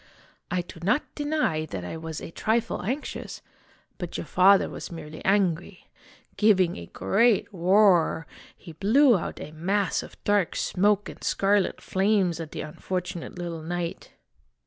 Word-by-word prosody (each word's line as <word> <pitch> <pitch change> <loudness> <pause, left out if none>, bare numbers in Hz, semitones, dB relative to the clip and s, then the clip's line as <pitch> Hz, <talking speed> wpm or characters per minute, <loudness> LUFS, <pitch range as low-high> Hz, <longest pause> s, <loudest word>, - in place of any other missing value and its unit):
"I 180 0 0
do 170 - -12
not 210 - +2
deny 290 - -1
that 95 -8 -6
I 90 - -5
was 160 -1 -6
a - - -8
trifle 220 +6 -1
anxious; 260 +10 -5 0.6
but 175 -2 -5
your - - -5
father 190 +4 +5
was - - -8
merely 155 -2 -8
angry. 185 -2 0 0.5
Giving 190 -5 +4
a 85 - -8
great 210 - +2
roar, 180 -3 +4 0.3
he 170 - -11
blew 230 - +4
out 180 - -4
a 150 - -7
mass 190 +4 0
of - - -12
dark 205 -4 +1
smoke 205 +1 +1
and - - -10
scarlet 200 0 +1
flames 190 -3 +1
at 160 -2 -6
the - - -5
unfortunate 180 +3 -5
little 170 -2 -5
knight. 170 +1 -4
180 Hz, 145 wpm, -26 LUFS, 165-205 Hz, 0.6 s, father